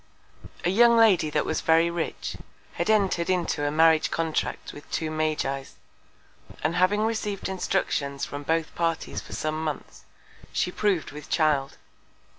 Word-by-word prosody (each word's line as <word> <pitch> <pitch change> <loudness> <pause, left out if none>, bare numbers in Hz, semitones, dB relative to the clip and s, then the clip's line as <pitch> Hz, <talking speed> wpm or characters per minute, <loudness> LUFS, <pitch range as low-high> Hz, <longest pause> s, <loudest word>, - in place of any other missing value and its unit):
A 175 - +3
young 235 +3 +6
Lady 200 -9 +5
that 150 0 0
was - - -1
very 165 +1 +3
rich, 170 -1 -4 0.4
had - - -2
entred 195 -5 +2
into 175 -5 0
a - - +1
Marriage 160 +1 +4
Contract 165 -1 -2
with 145 - -12
two 160 -1 -2
Magis; 155 -4 -2 0.9
and 155 +2 +1
having 185 +4 +3
receiv'd 215 -3 -2
Instructions 150 -7 -1
from 145 - -6
both 160 +2 -1
Parties 165 -1 -2
for - - -11
some 155 +1 -2
Months, 155 -3 -6 0.5
she 180 - 0
prov'd 195 -4 0
with 150 0 -10
Child. 150 -4 +1
165 Hz, 145 wpm, -26 LUFS, 155-185 Hz, 0.9 s, young